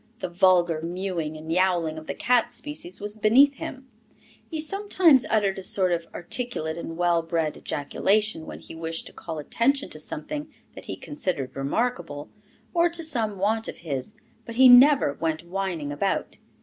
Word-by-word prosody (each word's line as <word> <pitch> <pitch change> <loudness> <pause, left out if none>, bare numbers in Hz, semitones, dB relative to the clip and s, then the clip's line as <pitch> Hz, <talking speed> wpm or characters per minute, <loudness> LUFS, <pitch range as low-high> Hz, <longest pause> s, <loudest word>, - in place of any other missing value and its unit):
The 185 - -4
vulgar 175 -3 +3
mewing 170 -2 -3
and 160 +1 -7
yowling 175 -3 +1
of 155 - -14
the - - -4
cat 245 -1 +2
species 240 -7 -6
was 205 +1 -3
beneath 255 +7 +5
him; 270 -5 -7 0.6
he 320 - -4
sometimes 345 -5 +3
uttered 200 -3 +1
a - - -8
sort 185 -1 +3
of 170 -1 -1
articulate 175 -4 -2
and 165 -1 -6
well 175 -1 +2
bred 165 -2 -1
ejaculation, 200 +5 0
when - - -7
he - - -11
wished 165 0 -4
to - - -11
call 165 -2 -7
attention 235 - 0
to 155 - -8
something 295 - -5 0.2
that - - -10
he - - -5
considered 185 - -4
remarkable, 150 - -2 0.4
or 345 0 +3
to 335 0 -1
some 230 -10 0
want 220 +4 0
of - - -6
his, 145 - -4 0.3
but 230 0 -8
he 260 +2 +7
never 250 - +7
went 160 0 -1
whining 175 -5 -3
about. 170 +7 -2
190 Hz, 170 wpm, -25 LUFS, 165-245 Hz, 0.6 s, he